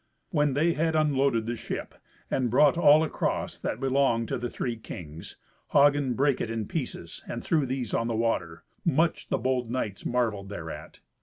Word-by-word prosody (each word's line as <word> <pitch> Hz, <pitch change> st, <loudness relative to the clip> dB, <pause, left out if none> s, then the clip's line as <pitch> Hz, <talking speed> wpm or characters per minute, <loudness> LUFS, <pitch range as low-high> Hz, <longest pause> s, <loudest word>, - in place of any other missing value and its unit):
When 150 Hz, -5 st, +2 dB
they 165 Hz, +4 st, +3 dB
had 160 Hz, +1 st, 0 dB
unloaded 140 Hz, -6 st, +2 dB
the 120 Hz, +1 st, -2 dB
ship, -, -, -5 dB, 0.4 s
and 130 Hz, -2 st, +1 dB
brought 135 Hz, +4 st, +5 dB
all 155 Hz, -2 st, +6 dB
across 160 Hz, -, -2 dB
that -, -, -3 dB
belonged 135 Hz, -4 st, +1 dB
to -, -, -1 dB
the 120 Hz, 0 st, -3 dB
three 120 Hz, 0 st, -3 dB
kings, 85 Hz, -8 st, -9 dB, 0.4 s
Hagen 140 Hz, -3 st, +4 dB
brake 140 Hz, 0 st, +2 dB
it 115 Hz, -, -2 dB
in 115 Hz, -1 st, -2 dB
pieces 125 Hz, -, -5 dB
and 120 Hz, -, -5 dB
threw 155 Hz, -5 st, +1 dB
these 125 Hz, -3 st, -3 dB
on 115 Hz, -, +1 dB
the 115 Hz, -, -1 dB
water. 85 Hz, -8 st, -1 dB, 0.2 s
Much 165 Hz, 0 st, +1 dB
the -, -, +1 dB
bold 125 Hz, 0 st, -1 dB
knights 110 Hz, -5 st, -3 dB
marvelled 110 Hz, -5 st, -1 dB
thereat. 80 Hz, -6 st, -8 dB
125 Hz, 175 wpm, -27 LUFS, 115-145 Hz, 0.4 s, all